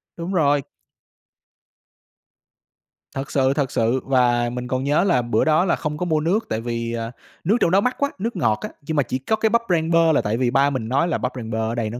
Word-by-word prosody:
Đúng 170 +3 -5
rồi. 145 -5 +3 2.5
Thật 135 0 -5
sự, 135 -1 +2
thật 140 -3 -1
sự, 115 +3 +1
và 120 -2 +2
mình 125 0 -5
còn 130 +1 -2
nhớ 145 +5 +2
là 155 -10 +2
bữa 120 -2 0
đó 155 +3 +3
là 170 - +2
không 150 -1 -4
có 180 - -2
mua 160 -3 +1
nước, 180 +9 0
tại 110 - -2
vì, 115 0 -3
ờ, 115 0 -4 0.3
nước 205 +8 +2
trong 170 - +3
đó 195 - +4
mắc 250 +4 0
quá, 280 0 0
nước 225 +2 -3
ngọt 110 -10 +1
á. - - -4
Nhưng 155 +2 -4
mà 145 - +4
chỉ 130 - -3
có 175 +12 0
cái 220 0 +1
bắp 235 +2 +2
rang 165 -2 +1
bơ 165 -1 +4
là 155 - +3
tại 105 +2 -1
vì 125 -1 +1
ba 140 +2 +3
mình 130 -6 -3
nói 140 +8 +1
là 170 - 0
"Bắp 125 - -2
rang 115 -3 -6
bơ 110 - -2
ở - - -4
đây 115 -2 -2
nó 120 +3 -6
140 Hz, 250 wpm, -22 LUFS, 120-170 Hz, 2.5 s, đó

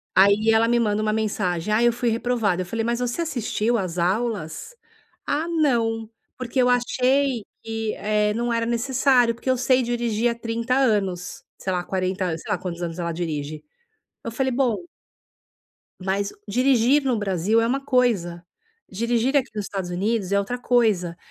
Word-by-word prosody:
Aí 200 +3 +5
ela 225 +1 +4
me 240 0 +3
manda 215 -2 +1
uma 215 0 +1
mensagem, 210 -4 -1
"Ai, 235 +2 +4
eu 235 - +3
fui 240 0 0
reprovada". 225 -5 0
Eu 180 - -3
falei: 225 +5 -3
"Mas 235 +1 0
você 245 +6 -2
assistiu 240 -6 -1
às 185 -3 -3
aulas?" 200 - -2 0.5
"Ah, 310 +3 -1
não, 235 -9 +1 0.3
porque 255 +1 -1
eu 250 - +3
achei 250 0 +1 0.2
que, 225 -1 -3
eh, 210 0 +1
não 235 +1 -1
era 230 0 0
necessário, 245 0 +2
porque 250 +3 -5
eu 255 - +3
sei 255 +1 +3
dirigir 235 -1 0
há 235 - -2
30 230 +2 -2
anos, 200 -9 0
sei 190 - -3
lá, 180 -1 -1
40 185 0 -2
an", 160 - -2
sei 205 - -7
lá 195 - +1
quantos 175 -2 -5
anos 170 +1 -4
ela 170 -1 -2
dirige. 155 -3 -4 0.6
Eu 230 - -4
falei, 260 +3 -1
"Bom" 245 -4 +1 1.2
mas 195 +2 -1
dirigir 255 +4 +3
no 250 -4 +1
Brasil 200 +2 +1
é 230 - +1
uma 265 +4 0
coisa, 200 -11 +1 0.5
dirigir 235 +6 0
aqui 270 -2 +1
nos 210 -2 -3
Estados 190 -3 -4
Unidos 200 +2 -1
é 200 - +4
outra 200 +5 -2
coisa. 215 -9 +1
225 Hz, 175 wpm, -23 LUFS, 195-245 Hz, 1.2 s, Aí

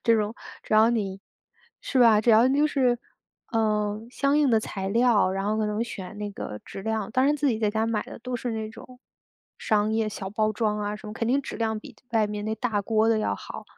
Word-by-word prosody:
这 230 - +4
种， 210 0 -1 0.3
只 - - -1
要 220 +2 +6
你 195 -5 -2 0.6
是 265 - -1
吧， 225 -3 +6
只 220 - -3
要 225 +2 +6
就 285 +3 +3
是 255 -5 +1 0.5
嗯， 215 0 0
相 280 +3 +1
应 290 -3 +3
的 225 - +5
材 195 -3 -4
料， 230 -3 +3
然 195 +1 -2
后 215 +1 +1
可 215 - +1
能 210 +1 -1
选 205 -3 -8
那 210 0 -4
个 105 - -6
质 195 - -8
量， 220 -1 -2
当 255 +3 +2
然 295 - +3
自 290 0 +1
己 225 -4 0
在 215 -2 +1
家 220 +1 0
买 225 -2 0
的 - - -10
都 250 +2 -5
是 245 +1 -4
那 220 -1 -3
种 250 +3 -13 0.6
商 215 0 +1
业 220 -1 +1
小 205 -2 -5
包 215 +1 +1
装 215 -1 0
啊 205 0 -2
什 215 - -12
么， 210 - -6
肯 230 - -2
定 270 +3 +3
质 - - -6
量 220 -1 -1
比 - - -13
外 220 -2 +2
面 210 0 -5
那 220 +1 -1
大 225 -5 -1
锅 220 +1 +2
的 225 -1 +3
要 215 - 0
好。 - - -9
220 Hz, 255 characters per minute, -26 LUFS, 210-235 Hz, 0.6 s, 要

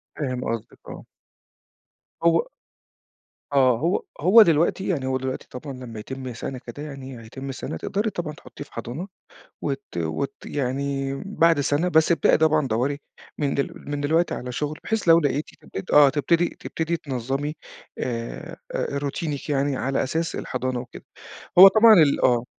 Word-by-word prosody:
فاهم 130 -4 -3
قصدِك 115 -1 -4
آه. - - -9 1.2
هو 170 - +3 1.1
آه، 130 -4 +4
هو 170 +6 0 0.2
هو 200 +8 +8
دلوقتي 170 +2 +2
يعني، 140 -8 -1
هو 130 0 0
دلوقتي 130 0 -5
طبعًا 135 +3 -7
لمّا 125 -4 -9
يتم 130 +2 -6
سَنة 130 +2 -5
كده 125 +4 -9
يعني، 135 -4 -8
هيتم 135 +4 -7
سَنة 135 - -6
تقدَري 210 +2 -2
طبعًا 165 -5 -4
تحطّيه 150 -2 -11
في - - -25
حضانة، 125 - -5 0.5
وت 140 -1 -3
وت 80 - -2
يعني 135 0 -2
بَعد 165 -6 +3
سنة. 145 +5 +1
بس 160 -1 +4
ابدئي 165 -4 +4
طبعًا 155 -3 +3
دوَّري 130 +6 -1 0.4
من 145 -2 0
دل 140 - -1 0.2
من 145 0 -2
دلوقتي 160 +4 +1
على 125 0 -5
شُغل، 150 +4 -3
بحيث 220 0 -1
لو 165 0 +8
لقيتِ 145 -1 -1
تبت 95 - -7
آه 145 -2 +7
تبتدي 165 +4 +2
تبتدي 165 +1 -2
تنظّمي 135 +2 -3 0.4
آآ، 115 -2 -5 0.2
آآ 140 - -2
روتينaك 145 +1 -4
يعني 140 -1 0
على 135 +1 0
أساس 165 +5 -2
الحضانة 130 0 -3
وكده. 125 - -10 0.5
هو 195 - +13
طبعًا 220 +3 +7
ال 155 -7 +5
آه. 120 -1 +3
140 Hz, 155 wpm, -24 LUFS, 130-160 Hz, 1.2 s, هو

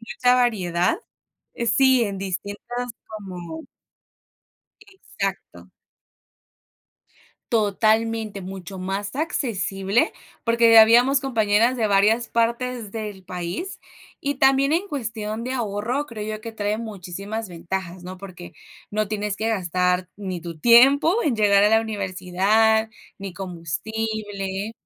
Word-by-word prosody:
mucha 245 +2 +1
variedad 195 - +1 0.6
eh, 235 - -3
sí 260 +2 +4
en 200 -2 -3
distintas, 205 +6 -5 0.2
como 180 -6 -8 1.2
Exacto. 195 - -6 1.8
Totalmente, 220 0 +1
mucho 190 0 -8
más 195 +3 -3
accesible, 230 - 0 0.3
porque, 230 0 +4
eh, - - +10
habíamos 245 +5 +6
compañeras 230 -2 +2
de 225 -3 +1
varias 210 +4 +3
partes 235 -1 -1
del 210 -3 -6
país. 180 - -5 0.4
Y 285 0 -1
también 270 +1 +4
en 360 +5 0
cuestión 220 - -4
de 255 - -3
ahorro 240 +3 -2
creo 215 -5 -6
yo - - -14
que 230 - -7
trae 210 -1 -2
muchísimas 205 0 -6
ventajas, 180 +1 -5
¿no? 185 +1 -8
Porque 180 -2 -10 0.4
no 215 +1 0
tienes 210 -1 -3
que 220 - -1
gastar 180 -3 0
ni 185 -4 -5
tu 165 -1 -8
tiempo 275 - +6
en 265 -7 0
llegar 200 -2 +4
a 205 - +6
la 220 +1 +4
universidad 215 +2 +1 0.3
ni 195 -1 -6
combustible 195 +3 -4
215 Hz, 120 wpm, -23 LUFS, 190-235 Hz, 1.8 s, eh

